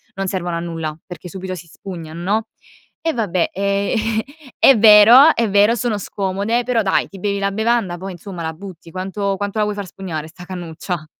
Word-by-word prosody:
non 195 0 -3
servono 180 -3 -2
a - - -2
nulla, 165 -2 -4
perché 180 -1 -9
subito 185 +1 -6
si 170 0 -11
spugnan 165 -2 -9
no? 215 +5 0 0.5
E 325 0 0
vabbè 195 -7 0
ehm 200 +3 0 0.4
è 270 - +6
vero, 225 +7 +8
è 230 -3 +1
vero, 205 +3 +4
sono 235 -2 -1
scomode, 200 +5 -2
però 240 -2 +1
dai, 195 - +1
ti 195 - -11
bevi 200 +1 -1
la 200 0 0
bevanda, 220 -4 0
poi 190 +1 -7
insomma 180 0 -8
la 160 - -3
butti, 170 -1 -11
quanto 195 +2 -2
quanto 205 +2 -4
la 210 - +3
vuoi 210 0 -3
far 205 -1 -5
spugnare 165 -5 -6
'sta 180 +2 -12
cannuccia? 175 -2 -5
195 Hz, 195 wpm, -19 LUFS, 175-210 Hz, 0.5 s, vero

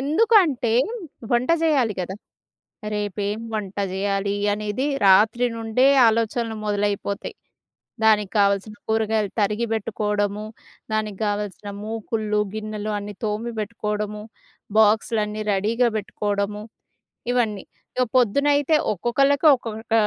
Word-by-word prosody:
ఎందుకంటే, 305 - +3 0.6
వంట 240 +4 +2
చేయాలి 265 -9 +2
గదా! 185 +2 -4 0.8
రేపేం 205 +1 -2
వంట 200 -2 -4
జేయాలి, 200 +1 -1 0.2
అనేది 210 +4 -3 0.2
రాత్రి 215 +6 +5
నుండే 225 +3 +2 0.2
ఆలోచనలు 225 0 -1
మొదలైపోతాయి. 205 -1 -2 0.7
దానికి 210 -3 +4
గావాల్సిన 200 +1 +2
కూరగాయలు 220 -2 +1
తరిగి 210 +3 +1
బెట్టుకోవడము, 210 -1 -1 0.5
దానికి 215 -2 -2
గావాల్సిన 205 0 -3
మూకుళ్ళు, 215 -1 -2
గిన్నెలు 215 0 -4
అన్నీ 205 0 -7
తోమి 220 +3 -2
బెట్టుకోవడము, 210 -1 -3 0.6
బాక్సులన్నీ 215 0 +2
రెడీగా 225 +5 +2
బెట్టుకోవడము 205 0 -2 0.7
ఇవన్నీ. 220 -5 0 0.3
ఇగ 255 - +3
పొద్దునైతే 285 +5 +3 0.2
ఒక్కొక్కళ్ళకి, 275 - +2
ఒక్కొక్క 225 -2 -8
215 Hz, 95 wpm, -23 LUFS, 205-230 Hz, 0.8 s, రాత్రి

